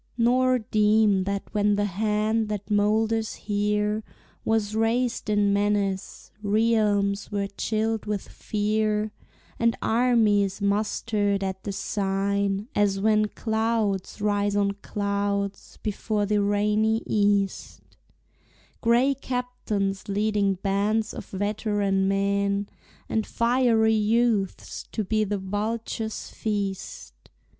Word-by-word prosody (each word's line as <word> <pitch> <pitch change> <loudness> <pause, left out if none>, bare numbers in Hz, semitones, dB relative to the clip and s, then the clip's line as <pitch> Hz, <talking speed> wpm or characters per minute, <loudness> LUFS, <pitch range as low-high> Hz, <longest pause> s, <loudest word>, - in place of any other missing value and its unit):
Nor 255 +2 +3
deem 215 -3 +3
that 200 0 -2
when 205 0 +2
the 205 0 +1
hand 215 +2 0
that 210 0 -4
molders 220 +2 +1
here 210 +1 -1 0.4
Was 220 -2 0
raised 230 +1 0
in 205 -1 +3
menace, 200 -1 -1
realms 205 -2 +1
were 200 -1 -1
chilled 215 +2 -2
with 210 -2 -3
fear, 215 0 -1 0.5
And 230 0 +2
armies 220 -5 +2
mustered 205 0 0
at 190 0 -3
the 205 - -2
sign, 200 +1 -1
as 200 -1 +2
when 215 +1 +3
Clouds 220 -3 -1
rise 205 -1 +1
on 200 -1 +2
clouds 200 -1 -2
before 210 0 -1
the 205 0 +1
rainy 210 +2 +1
East, 205 -2 0 1.0
Gray 240 +4 +4
captains 245 -7 -3
leading 205 -1 +1
bands 205 +3 0
of - - -8
veteran 205 -1 0
men 200 0 0 0.4
And 220 -1 -1
fiery 235 -2 +3
youths 220 -2 +1
to 220 - -1
be 215 +2 +1
the 205 0 -1
vulture's 220 +3 -3
feast. 200 - -4
210 Hz, 105 wpm, -25 LUFS, 200-220 Hz, 1.0 s, Gray